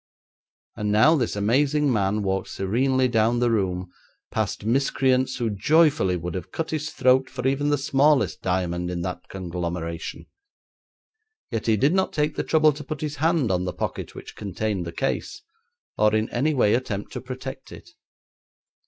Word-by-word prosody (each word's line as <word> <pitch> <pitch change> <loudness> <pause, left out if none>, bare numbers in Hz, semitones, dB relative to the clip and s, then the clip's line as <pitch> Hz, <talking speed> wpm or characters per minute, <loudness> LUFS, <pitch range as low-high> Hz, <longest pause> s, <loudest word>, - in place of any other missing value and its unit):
And 105 -1 -2
now 110 +10 +6
this 125 -9 -1
amazing 135 +7 +2
man 105 0 0
walked 95 0 -1
serenely 130 +7 +1
down 115 0 +2
the 120 -1 +2
room 90 -4 -1 0.4
past 105 -2 -2
miscreants 130 +1 +2
who 115 -3 -1
joyfully 145 - +3
would 85 0 -5
have 90 -1 -6
cut 165 - -3
his 155 -1 -2
throat 130 0 +3
for 130 -1 -3
even 140 +2 +1
the 145 - +2
smallest 140 +1 +2
diamond 90 -1 -1
in 90 -1 -3
that 90 +1 -5
conglomeration; 85 -2 -5 1.3
yet 115 -1 -3
he 110 -1 +3
did 140 - +3
not 190 0 +1
take 150 -1 0
the - - -1
trouble 155 -1 +4
to 150 +1 -8
put 150 0 -6
his 150 -1 -3
hand 155 - +2
on 90 0 0
the 90 - -3
pocket - - -4
which - - -10
contained 100 -3 -3
the - - -4
case, 135 +10 -3 0.6
or 105 0 +4
in 110 +1 +1
any 145 +5 +1
way 105 -5 +3
attempt 110 -5 -2
to - - -5
protect 130 +1 -8
it. - - -12
120 Hz, 170 wpm, -24 LUFS, 95-140 Hz, 1.3 s, now